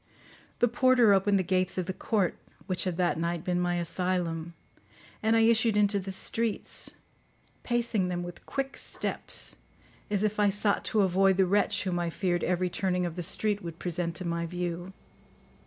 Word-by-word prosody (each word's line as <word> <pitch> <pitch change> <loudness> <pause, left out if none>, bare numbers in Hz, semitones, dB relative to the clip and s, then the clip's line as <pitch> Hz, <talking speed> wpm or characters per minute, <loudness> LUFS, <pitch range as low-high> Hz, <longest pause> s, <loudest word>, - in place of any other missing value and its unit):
The 240 - +3
porter 255 -4 +4
opened 200 +1 +3
the 190 - +1
gates 185 0 0
of 185 - -1
the 185 - -3
court, 200 -1 0 0.3
which 185 -1 -1
had 180 -2 -2
that 175 -3 +1
night 170 0 -2
been 180 -1 0
my 175 0 0
asylum, 170 -1 -2 0.7
and 220 +1 +2
I 225 - +4
issued 225 -1 +3
into 205 -1 +3
the 195 0 -6
streets, 225 +3 -1 0.7
pacing 235 -5 0
them 175 -1 -2
with 175 0 -9
quick 275 0 -3
steps, - - 0 0.5
as 205 -1 +1
if 215 0 0
I 205 -1 +4
sought 205 +1 +1
to 215 - +2
avoid 190 0 +3
the 190 - +4
wretch 200 +3 +1
whom 180 -3 -1
I 170 -1 -1
feared 175 0 -1
every 180 0 +1
turning 180 0 -1
of 170 -2 -4
the 180 - -3
street 205 +4 0
would 170 -3 -7
present 175 -1 -3
to 185 - -5
my 170 0 -2
view. 175 +1 -4
185 Hz, 180 wpm, -28 LUFS, 175-205 Hz, 0.7 s, porter